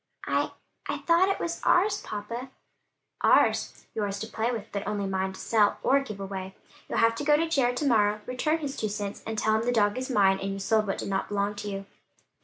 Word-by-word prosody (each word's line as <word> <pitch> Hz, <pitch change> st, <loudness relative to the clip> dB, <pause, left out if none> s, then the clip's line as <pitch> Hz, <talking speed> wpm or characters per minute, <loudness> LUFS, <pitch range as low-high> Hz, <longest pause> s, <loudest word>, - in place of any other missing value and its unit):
"I -, -, +1 dB, 0.4 s
I -, -, -1 dB
thought 345 Hz, +3 st, +3 dB
it 390 Hz, -, 0 dB
was 340 Hz, 0 st, -3 dB
ours, 405 Hz, +3 st, +3 dB
papa." 230 Hz, +5 st, -6 dB, 0.7 s
"Ours? -, -, +3 dB
Yours 205 Hz, -2 st, -2 dB
to -, -, -2 dB
play 225 Hz, +1 st, -1 dB
with, 225 Hz, -4 st, -4 dB
but 200 Hz, 0 st, -4 dB
only 205 Hz, -1 st, -1 dB
mine 190 Hz, 0 st, -1 dB
to -, -, -11 dB
sell 210 Hz, -3 st, +2 dB
or 275 Hz, +2 st, +4 dB
give 215 Hz, -8 st, -7 dB
away. 190 Hz, -1 st, -6 dB, 0.3 s
You'll -, -, -2 dB
have 230 Hz, 0 st, +4 dB
to 260 Hz, -, -5 dB
go 295 Hz, 0 st, +5 dB
to 330 Hz, +2 st, +1 dB
Jared 255 Hz, -6 st, +1 dB
to 295 Hz, -, -1 dB
morrow, 210 Hz, -4 st, +3 dB
return 280 Hz, +6 st, 0 dB
his 280 Hz, -2 st, -4 dB
two 215 Hz, -, -2 dB
cents, 205 Hz, -1 st, -4 dB
and 220 Hz, 0 st, -3 dB
tell 215 Hz, 0 st, +2 dB
him -, -, 0 dB
the 240 Hz, +2 st, 0 dB
dog 210 Hz, 0 st, +2 dB
is 260 Hz, -, -4 dB
mine, 195 Hz, -5 st, +4 dB
and 195 Hz, 0 st, -2 dB
you -, -, -5 dB
sold 215 Hz, +2 st, +1 dB
what 195 Hz, -, -1 dB
did -, -, -4 dB
not 195 Hz, 0 st, -1 dB
belong 205 Hz, 0 st, 0 dB
to 205 Hz, -, -4 dB
you." 195 Hz, 0 st, -5 dB
215 Hz, 230 wpm, -27 LUFS, 200-255 Hz, 0.7 s, go